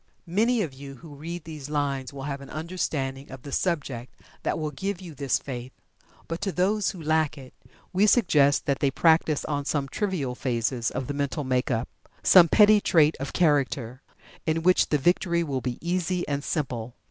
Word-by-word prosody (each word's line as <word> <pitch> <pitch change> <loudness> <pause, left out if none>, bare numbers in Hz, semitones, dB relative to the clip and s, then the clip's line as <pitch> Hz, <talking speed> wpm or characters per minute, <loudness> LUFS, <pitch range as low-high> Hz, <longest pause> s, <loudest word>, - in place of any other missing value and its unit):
Many 220 +6 +2
of 150 -7 -5
you 135 +1 -10
who 150 +3 -12
read 165 +4 -7
these 155 -4 -8
lines 140 -3 -1
will 140 -1 -8
have 140 -1 -4
an 140 - -11
understanding 150 -5 -3
of 135 -1 -10
the 140 - -8
subject 135 -8 -2 0.3
that - - -1
will 155 -1 -3
give 195 +6 -3
you 175 -4 -9
this 140 -2 0
faith. 125 -2 -7 0.6
But 165 +1 -4
to 195 - -1
those 200 +3 +1
who 185 - -7
lack 155 -1 +1
it, 130 -2 -12 0.4
we 195 +3 +4
suggest 150 - +4
that 140 -1 0
they 140 - +2
practice 160 +1 +3
on 145 -1 -2
some 140 -1 -1
trivial 175 -7 -2
phases 120 -1 -1
of 135 - -4
the 145 - -4
mental 140 +1 -2
make 130 -1 0
up, 115 -1 -1 0.4
some 180 -3 +8
petty 210 +3 +6
trait 155 -4 +4
of 135 +1 -4
character, 140 -6 +1 0.5
in 160 +1 +1
which 180 +1 +4
the 150 - +3
victory 170 +3 +2
will 135 -5 -2
be 125 -1 -3
easy 180 0 -1
and 145 -1 -2
simple. 125 -7 -3
145 Hz, 190 wpm, -26 LUFS, 135-170 Hz, 0.6 s, some